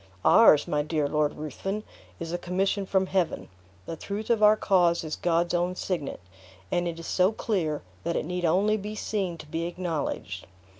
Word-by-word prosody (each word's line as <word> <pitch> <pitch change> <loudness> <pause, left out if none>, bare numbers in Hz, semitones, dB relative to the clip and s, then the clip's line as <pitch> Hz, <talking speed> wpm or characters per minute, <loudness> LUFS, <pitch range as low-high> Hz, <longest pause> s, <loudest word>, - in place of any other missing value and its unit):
Ours, 190 -10 +7
my 150 - +1
dear 155 -1 0
Lord 150 0 0
Ruthven, 195 +8 -4 0.4
is 165 -1 -5
a 175 - -1
commission 190 +2 -1
from 190 0 +2
Heaven. 185 -2 -1 0.4
The 165 - -5
truth 205 +7 -4
of 225 -2 +2
our 210 0 +7
cause 175 -5 +3
is 155 -1 -3
God's 170 0 +1
own 175 +1 0
signet, 165 - -3 0.5
and 175 0 +1
is 165 -1 -5
so 185 +2 +3
clear, 180 -9 -1 0.2
that 170 - -1
it - - -1
need 180 +2 -3
only 195 +6 +3
be 210 +1 -6
seen 195 -5 -2
to 155 - -10
be 165 +3 -3
acknowledged. 160 - -4
175 Hz, 180 wpm, -27 LUFS, 160-195 Hz, 0.5 s, Ours